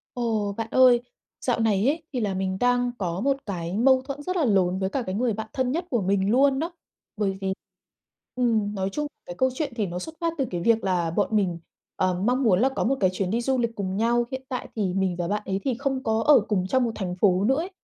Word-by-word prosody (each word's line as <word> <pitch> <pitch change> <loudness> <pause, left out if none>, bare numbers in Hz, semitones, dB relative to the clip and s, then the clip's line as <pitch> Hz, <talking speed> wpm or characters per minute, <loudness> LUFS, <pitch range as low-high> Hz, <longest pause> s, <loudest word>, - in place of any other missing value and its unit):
Ồ. 220 -4 -1
Bạn 225 -1 -3
ơi, 255 -2 +6 0.4
dạo 245 -2 0
này 215 -1 +2
ấy, 315 +3 0
thì 255 - -2
là 205 -3 -1
mình 190 0 -1
đang 245 0 +2
có 180 -2 -2
một 275 +3 +2
cái 175 -2 -4
mâu 260 +3 +4
thuẫn 275 +2 -6
rất 365 +5 -3
là 330 - +2
lớn 190 -5 +2
với 190 0 -1
cả 270 - -1
cái 185 -5 -4
người 235 +3 +1
bạn 220 +1 -5
thân 260 -1 0
nhất 335 +5 -1
của 240 -5 +1
mình 195 +1 +1
luôn 270 +3 +4
đó. 330 +4 -2 0.4
Bởi 195 -2 -1
vì 190 -1 -1 0.8
ừm, 225 -5 +1
nói 190 -1 -1
chung 295 +5 -2 0.2
cái 175 - -6
câu 260 0 +3
chuyện 290 0 -3
thì 215 -4 0
nó 175 0 -4
xuất 320 - -7
phát 335 -1 0
từ 270 - +2
cái 175 - -3
việc 225 +5 +2
là 180 -3 +1
bọn 200 +5 0
mình, 185 -5 +1 0.4
ờ, 185 -1 +1
mong 250 +4 +2
muốn 200 -6 +4
là 260 - +4
có 265 - -2
một 270 +3 +2
cái 185 - +4
chuyến 185 0 -2
đi 230 +3 +1
du 260 +2 0
lịch 235 -1 -1
cùng 190 -2 -3
nhau, 235 +3 +2
hiện 260 -1 -4
tại 255 - -4
thì 195 -4 0
mình 190 -2 0
và 175 -1 -2
bạn 210 +2 -1
ấy 195 0 -1
thì 265 - +1
không 270 -1 -1
có 220 -1 +1
ở 295 -4 +7
cùng 185 -4 +1
trong 255 +6 +2
một 230 - -1
thành 180 -4 -4
phố 190 -2 +3
nữa 260 +5 +4
ấy, 340 +5 -3
220 Hz, 260 wpm, -25 LUFS, 190-260 Hz, 0.8 s, ở